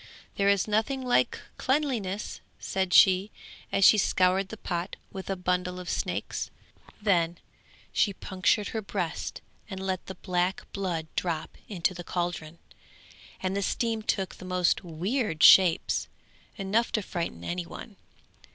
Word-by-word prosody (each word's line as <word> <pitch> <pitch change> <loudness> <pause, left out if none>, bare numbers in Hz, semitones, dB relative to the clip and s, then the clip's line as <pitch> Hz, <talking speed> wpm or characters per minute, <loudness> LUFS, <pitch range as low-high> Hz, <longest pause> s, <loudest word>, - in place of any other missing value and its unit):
'There 200 0 +3
is 200 0 +3
nothing 225 +6 0
like 250 -1 +2 0.2
cleanliness,' 250 -9 -1 0.2
said 190 -1 -2
she, 190 +2 +6 0.4
as 195 - +4
she 215 - +8
scoured 185 0 +2
the 220 - -7
pot 175 -1 -3 0.2
with 190 0 -7
a 195 - 0
bundle 180 0 -1
of 180 - -8
snakes; - - -2 0.5
then 175 -5 +2 0.6
she 205 - +3
punctured 195 +2 0
her 220 - -3
breast 190 -5 -4 0.3
and 190 -2 -5
let 190 -1 -3
the 190 - -6
black 180 0 -1
blood 180 -5 -2
drop 165 -3 -2
into 185 -3 0
the 175 -1 -7
caldron, 175 -2 -3 0.9
and 185 +1 0
the 200 - 0
steam 225 +2 0
took 195 -3 -1
the - - -12
most 180 0 +1
weird 175 - -1
shapes, 180 -4 +6 0.5
enough 210 +4 +1
to 215 - 0
frighten 170 - -4
any 175 - -3
one. 210 +3 -9
190 Hz, 140 wpm, -28 LUFS, 180-205 Hz, 0.9 s, she